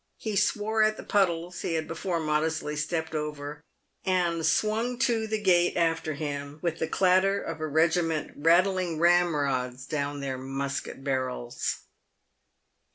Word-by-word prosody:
He 215 -2 -4
swore 215 +3 +1
at 215 0 +3
the - - -8
puddles 175 -3 0
he 165 - -1
had 160 -1 -2
before 170 +1 -2
modestly 155 0 -1
stepped 160 +2 -2
over, 150 -1 -4 0.4
and 175 -3 +1
swung 215 +9 +1
to 235 -4 +1
the 220 0 -1
gate 175 -4 +3
after 165 -2 0
him 145 -1 -4
with 170 -2 -1
the 160 - 0
clatter 190 +3 +3
of 165 -4 -5
a 155 - -1
regiment 160 +1 +1
rattling 175 +2 +3
ramrods 145 -7 +2
down 145 -1 -2
their 135 -2 -3
musket 135 +1 -4
barrels. 130 -3 -2
165 Hz, 140 wpm, -27 LUFS, 145-185 Hz, 0.4 s, at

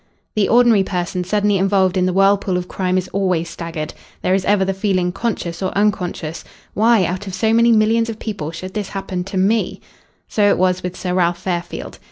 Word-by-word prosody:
The 210 -2 +2
ordinary 235 -4 +5
person 180 -1 -2
suddenly 205 +1 +1
involved 190 -1 +2
in 185 -1 +2
the - - +1
whirlpool 195 0 +2
of 180 0 -4
crime 185 -1 -1
is 185 0 -1
always 180 -4 -1
staggered. 165 -2 -5 0.3
There 185 - +2
is 190 -1 +1
ever 200 -2 +3
the 195 - 0
feeling, 190 -2 0
conscious 180 -5 -3
or 185 - 0
unconscious: 180 -6 -1 0.3
"Why 220 -2 +4
out 185 +4 -4
of 190 - -4
so 220 +4 +1
many 235 +1 +5
millions 225 +1 +3
of 225 - -5
people 200 -10 -5
should 185 +3 -7
this 205 -3 -3
happen 190 -2 -4
to 195 0 -5
me?" 210 +4 +1 0.5
So 205 -1 +2
it - - +3
was 185 0 +1
with 180 0 -5
Sir 180 -1 -3
Ralph 175 -1 +2
Fairfield. 175 -1 -5
190 Hz, 205 wpm, -19 LUFS, 180-205 Hz, 0.5 s, ordinary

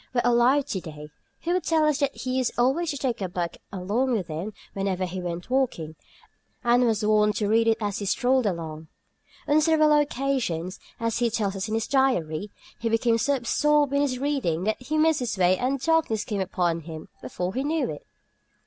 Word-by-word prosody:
were 240 - +3
alive 245 +4 +4
to 190 -9 -3
day 150 -2 -10 0.3
he 345 - -2
would 365 -2 0
tell 320 -2 +2
us 300 -1 +2
that 280 -2 0
he 255 0 -3
used 255 -3 +1
always 270 +8 +2
to 285 - -2
take 255 -5 -2
a 190 - -2
book 175 -1 -3
along 210 +7 0
with 190 -7 -2
him 165 +7 -4 0.2
whenever 195 -1 -1
he 185 +1 -5
went 175 0 -5
walking, 200 - 0 0.7
and 240 +1 +4
was 220 -2 0
wont 210 0 +3
to 210 - 0
read 225 +2 +3
it 225 - +3
as 205 -3 -2
he 205 - -4
strolled 255 +3 +2
along. 160 -4 -4 0.6
On 300 +1 +4
several 310 -1 +4
occasions 260 - 0 0.2
(as 230 0 -1
he 240 -1 +2
tells 210 -3 -1
us 195 +2 -3
in 215 - -2
his 225 - 0
diary) 210 - +1 0.3
he 230 -1 -1
became 230 0 +2
so 280 +6 +2
absorbed 290 +3 +2
in 280 - +3
his 270 -3 0
reading 255 - -1
that 220 +4 -1
he 305 +5 -2
missed 315 0 +3
his 240 -5 -2
way 185 0 +4
and 260 +6 -1
darkness 310 -9 +1
came 205 -3 -2
upon 175 -3 0
him 160 -1 -9
before 180 +1 -4
he 260 - -1
knew 315 +2 0
it. - - -8
230 Hz, 205 wpm, -25 LUFS, 185-275 Hz, 0.7 s, alive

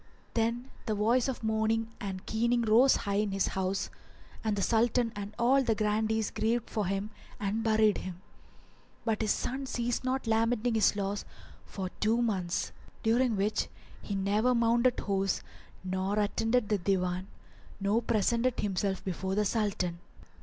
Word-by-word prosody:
Then 235 +3 -1 0.2
the 215 - +1
voice 230 +5 +2
of 260 -3 -4
mourning 220 +1 +1
and 190 -2 -5
keening 235 +2 +1
rose 230 +5 +6
high 200 0 -1
in 210 - -1
his 195 0 +1
house 190 0 -2 0.5
and 215 -2 +1
the 200 - -1
Sultan 235 +1 +2
and 205 +1 -6
all 255 +3 +4
the 230 -4 +1
grandees 215 +1 0
grieved 230 +1 -1
for 210 -4 -1
him 195 +2 -2 0.3
and 210 +2 -1
buried 220 -2 +3
him; 180 -2 -7 0.9
but 225 -2 0
his 215 - 0
son 265 +5 -1
ceased 240 -1 -1
not 260 +1 -1
lamenting 225 +1 +1
his 220 -2 +3
loss 200 0 -2 0.4
for 190 -2 -5
two 220 +3 +2
months, 190 -7 -1 0.3
during 235 +1 +3
which 205 +2 0 0.3
he 200 - -4
never 210 +6 +2
mounted 235 +1 +3
horse, 195 -1 0 0.4
nor 190 +2 -1
attended 225 +2 +1
the 210 -2 +2
Divan 185 0 0 0.5
nor 205 +4 +2
presented 235 +2 +1
himself 195 -1 -1
before 190 +1 -2
the 210 0 +2
Sultan. 190 -5 -1
215 Hz, 155 wpm, -30 LUFS, 200-235 Hz, 0.9 s, rose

